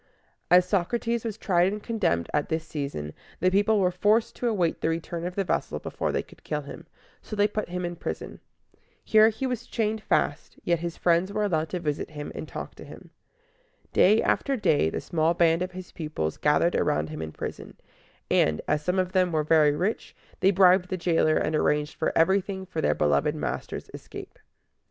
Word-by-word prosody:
As 180 +1 +6
Socrates 230 +5 0
was 220 -3 -4
tried 180 -3 +2
and 210 0 -6
condemned 190 - 0
at 150 -1 0
this 160 0 -2
season, 140 - -5 0.3
the 185 +2 +2
people 205 +2 +3
were 180 -2 +2
forced 210 +5 +2
to 245 - -1
await 185 -8 0
the - - +1
return 165 +1 -3
of 180 - -7
the 195 - 0
vessel 180 - -1
before - - -3
they - - -1
could - - -19
kill - - -2
him: - - -10 0.3
so 215 - -7
they 205 0 +3
put 210 -1 -4
him 180 0 -3
in 175 0 -4
prison. - - -6 0.6
Here 220 0 +6
he 225 +4 -4
was 250 -2 -3
chained 220 -1 -1
fast, - - -1
yet 170 -1 +1
his 170 0 -5
friends 175 +2 +2
were 210 +1 -1
allowed 160 -6 0
to 180 - -3
visit 150 -4 -3
him 150 -1 -7
and - - -6
to - - -17
talk - - -6
with - - -10
him. - - -13 0.8
Day 215 +4 +5
after 275 - +1
day 150 - +2
the - - -4
small 165 0 +1
band 165 0 +3
of 185 0 -3
his 185 0 -9
pupils 150 - -4
gathered 150 +4 +2
around 75 +1 +1
him 80 0 -6
in 80 -1 -5
prison; - - -7 0.5
and, 75 -1 +3
as 150 - +1
some 180 +4 0
of 185 -1 0
them 185 -2 +2
were 155 -2 +1
very 150 -1 +4
rich, 190 +8 -2 0.2
they 190 - +4
bribed 185 -1 +5
the 185 - -2
jailer, 165 -3 +2
and 155 - 0
arranged 150 0 0
everything 190 +2 +1
for 165 -3 -4
their - - +2
beloved 70 -1 +1
master's - - -4
escape. - - -10
180 Hz, 200 wpm, -26 LUFS, 155-200 Hz, 0.8 s, As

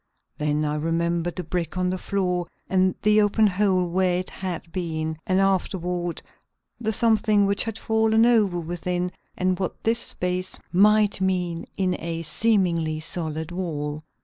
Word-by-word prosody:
Then 150 0 0
I 150 0 -1
remembered 170 +2 -1
the 180 - -3
brick 175 -1 -3
on 180 0 +1
the 185 - -2
floor 180 -3 -1 0.2
and 185 0 +2
the 210 0 +5
open 210 +1 +3
hole 190 -2 +2
where 180 0 +1
it 185 - -4
had 175 -3 -5
been, 160 -3 -3
and 185 0 +2
afterward 180 -2 -1 0.6
the 220 -2 -1
something 215 -2 +3
which 200 0 +1
had 225 -1 -4
fallen 220 0 +3
over 210 -7 +3
within 175 +2 -2 0.3
and 185 0 0
what 185 - -4
this 230 +1 +2
space 180 -3 -2
might 210 +1 +4
mean 180 -3 -1
in 185 -2 +1
a 165 0 -3
seemingly 170 -3 +1
solid 160 -1 -3
wall. 150 -4 -3
180 Hz, 150 wpm, -24 LUFS, 170-200 Hz, 0.6 s, the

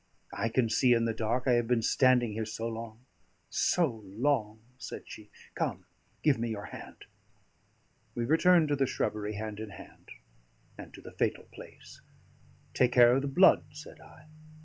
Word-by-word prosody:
"I 115 +3 -2
can 115 +1 +1
see 125 +2 +3
in 115 -1 +2
the 115 - -1
dark. 115 +3 -1
I - - +4
have 120 -1 +2
been 120 -2 +1
standing 125 -2 +3
here 110 +1 -3
so 110 +1 -5
long 115 +1 -8 0.5
so 175 -2 +2 0.2
long," 110 +1 -1 0.2
said - - -8
she. 105 -1 -12 0.2
"Come, - - -3 0.4
give 145 -6 +3
me 115 0 -2
your 105 -2 -5
hand." - - -11 1.1
We 120 - -2
returned 165 +3 +4
to 145 - +2
the 135 -1 +1
shrubbery 105 -4 -3
hand 110 0 -6
in 110 -1 -6
hand, - - -14 0.7
and - - -11
to - - -12
the - - -11
fatal - - -1
place. - - -14 0.7
"Take 125 -1 +2
care 120 0 +6
of 135 - +1
the 140 - -3
blood," 180 +8 +5
said 150 +1 -12
I. 150 - -17
120 Hz, 170 wpm, -29 LUFS, 110-135 Hz, 1.1 s, care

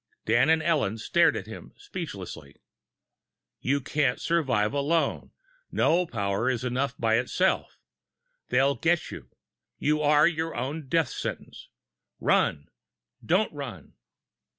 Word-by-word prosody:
Dan 120 +6 +3
and 160 0 +3
Ellen 145 -11 +1
stared 170 +9 +3
at - - -5
him - - -10
speechlessly. 100 - -8 1.1
_You 140 0 0
can't 135 -4 +1
survive 130 -11 +1
alone! 145 +4 0 0.4
No 175 +2 +2
power 100 0 -1
is 125 -2 -1
enough 125 +1 -1
by 115 0 +2
itself! 180 +9 0 0.7
They'll 135 +1 +3
get 165 +3 0
you! - - -9 0.5
You 150 +1 +1
are 150 +1 +5
your 165 -1 -2
own 135 +5 -4
death 160 +3 +1
sentence! - - -6 0.5
RUN! 70 - +1 0.5
DON'T 185 +4 +1
RUN! 125 - -8
140 Hz, 120 wpm, -27 LUFS, 120-160 Hz, 1.1 s, are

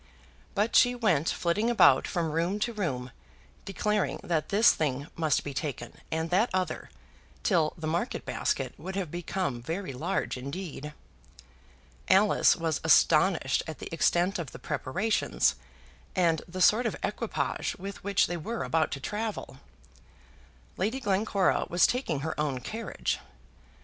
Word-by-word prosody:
But 210 +3 +1
she 245 0 +6
went 190 - +2
flitting 205 +7 0
about 240 - +5
from 170 -4 -1
room 170 +5 0
to 235 +2 0
room, 130 - -3 0.5
declaring 210 +1 -1
that 160 -3 -1
this 215 +4 +6
thing 140 -3 -1
must 160 -2 +1
be 145 - -5
taken, 140 +1 -4 0.2
and 160 +1 -2
that 210 +7 +3
other, 185 -1 -2 0.5
till 165 -7 +2
the 160 - -6
market 170 +9 -2
basket - - -1
would 190 +1 -6
have 185 -6 -3
become 175 -7 -3
very 165 +4 -4
large 160 +2 -2
indeed. 150 +2 -6 1.2
Alice 200 +3 +5
was 165 -3 -2
astonished 160 -2 +4
at 160 - -6
the - - -8
extent 175 +3 +2
of 155 -7 -6
the - - -7
preparations, 165 +9 0 0.6
and 170 -4 +2
the 185 +1 -5
sort 225 +6 +5
of - - -3
equipage - - -2
with 195 0 -8
which 200 -1 +3
they 175 - -3
were 225 +9 -4
about 160 -1 +1
to 140 - -4
travel. 210 -3 -4 1.2
Lady 220 +8 -1
Glencora 200 -3 +1
was 175 +1 +4
taking 180 - -1
her 160 +2 -2
own 145 -4 0
carriage. 225 - -3
175 Hz, 145 wpm, -28 LUFS, 155-200 Hz, 1.2 s, she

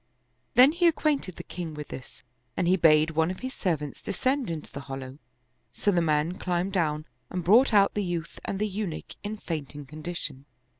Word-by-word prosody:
Then 260 +3 +8
he. 345 +2 +3
acquainted 300 - +1
the - - -7
king 170 -3 -6
with 150 -1 -7
this 130 - -10 0.3
and 180 - +1
he 185 - +5
bade 155 -2 +5
one 160 +1 +2
of 185 - -5
his 260 +1 -4
servants 155 - -2
descend 260 +4 0
into 160 -2 -5
the - - -6
hollow; 135 +1 -6 0.5
so 205 - +1
the 175 -3 +3
man 155 +2 +1
climbed 180 +2 -1
down 155 -4 0 0.2
and 180 -1 -3
brought 230 +10 +6
out 200 -2 +5
the 210 - 0
youth 170 -2 -4
and 195 - -3
the 210 +2 0
Eunuch 200 -4 -4
in 210 +1 -4
faint 155 -7 -5
ing 145 -1 -7
condition. 155 -2 -5
175 Hz, 195 wpm, -27 LUFS, 155-205 Hz, 0.5 s, Then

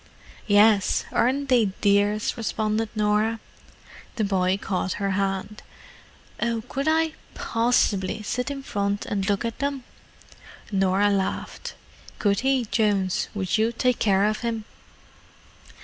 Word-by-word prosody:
"Yes—aren't 220 +6 +3
they 245 -4 +4
dears?" 205 +1 +2
responded 220 -1 -1
Norah. 215 +1 +1 0.8
The 220 - 0
boy 190 -2 +1
caught 190 -1 -2
her 200 -1 -2
hand. 195 +2 -2 0.8
"Oh—could 235 +5 -2
I 320 0 +2 0.2
possibly 220 -3 +1
sit 250 +5 -2
in 275 -1 -5
front 200 -3 -2
and 195 0 -2
look 205 +3 0
at 230 - -4
them?" 280 -2 -2 0.9
Norah 195 +1 +2
laughed. 195 -1 -3 0.4
"Could 200 -2 +1
he, 265 -2 +1
Jones? 205 -4 0
Would 190 +1 0
you 225 +1 +2
take 250 +1 0
care 195 -1 +3
of 215 0 0
him?" 230 -2 -3
210 Hz, 115 wpm, -24 LUFS, 200-235 Hz, 0.9 s, they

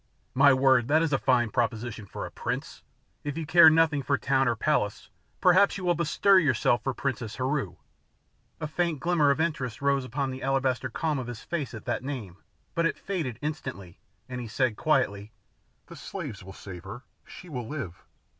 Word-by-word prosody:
"My 140 +2 +6
word, 130 -2 +4
that 155 +3 +3
is 160 -3 0
a 135 - +2
fine 120 -4 +2
proposition 115 -2 -2
for - - -6
a - - -8
prince! - - -5 0.4
If 145 +1 -4
you 165 - -3
care 160 +1 +8
nothing 160 -2 +3
for 140 +1 +1
town 135 0 +1
or 120 - +2
palace 110 -5 -1 0.3
perhaps 185 +3 +5
you 190 - -7
will 175 - +4
bestir 180 +4 +4
yourself 130 -6 +2
for 135 -2 -2
Princess 120 -5 -3
Heru." 130 - -2 0.8
A 155 - -3
faint 165 0 -1
glimmer 170 -3 +2
of 140 +2 +2
interest 150 -9 -2
rose 140 -1 +1
upon 130 +2 -2
the 130 +1 -7
alabaster 135 -2 0
calm 155 -3 -1
of 125 - -5
his 120 -2 -7
face 145 -9 -4
at 110 - -10
that - - -2
name, 120 -10 -6 0.4
but 170 0 +2
it - - -3
faded 160 - -3
instantly, 130 - -5 0.3
and 125 -1 -5
he 120 - -6
said 120 0 0
quietly, 110 -7 0 0.5
"The - - -12
slaves 100 - -7
will 95 - -10
save 90 -3 -10
her. 110 +7 -9 0.2
She 180 - -11
will 125 -8 -5
live. 120 - -6
135 Hz, 190 wpm, -27 LUFS, 120-155 Hz, 0.8 s, care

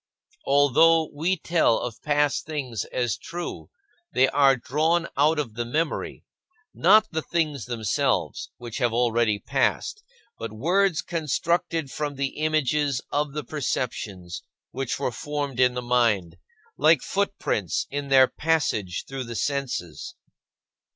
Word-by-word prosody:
Although 150 +4 +4
we 170 +6 0
tell 165 -8 +2
of 120 -1 -5
past 145 -1 +1
things 130 -9 -3
as 120 -3 -2
true, 175 +1 -6 0.4
they 130 - +4
are 140 -1 +5
drawn 155 +7 0
out 150 +3 +3
of 135 -7 -2
the 120 +2 -2
memory 150 +7 -2 0.5
not 215 +5 +5
the 160 - -1
things 150 -8 -1
themselves, 115 -5 -1
which 120 0 -7
have 120 -3 +1
already 115 -2 +2
passed, 420 - -1 0.4
but 115 -1 -5
words 170 - +1
constructed 165 -1 -1
from 150 -1 -3
the 135 0 -3
images 150 -3 +1
of 145 -1 -1
the 150 0 -3
perceptions 105 - -4 0.3
which 135 -1 -3
were - - -1
formed 145 -2 -4
in 125 -1 +4
the 125 - -3
mind, 115 -9 +1 0.4
like 155 0 +5
footprints 195 - -1
in 145 0 -3
their 135 -1 +6
passage 135 - -1
through 135 -2 -5
the 115 0 -7
senses. 130 - -3
140 Hz, 130 wpm, -25 LUFS, 120-155 Hz, 0.5 s, their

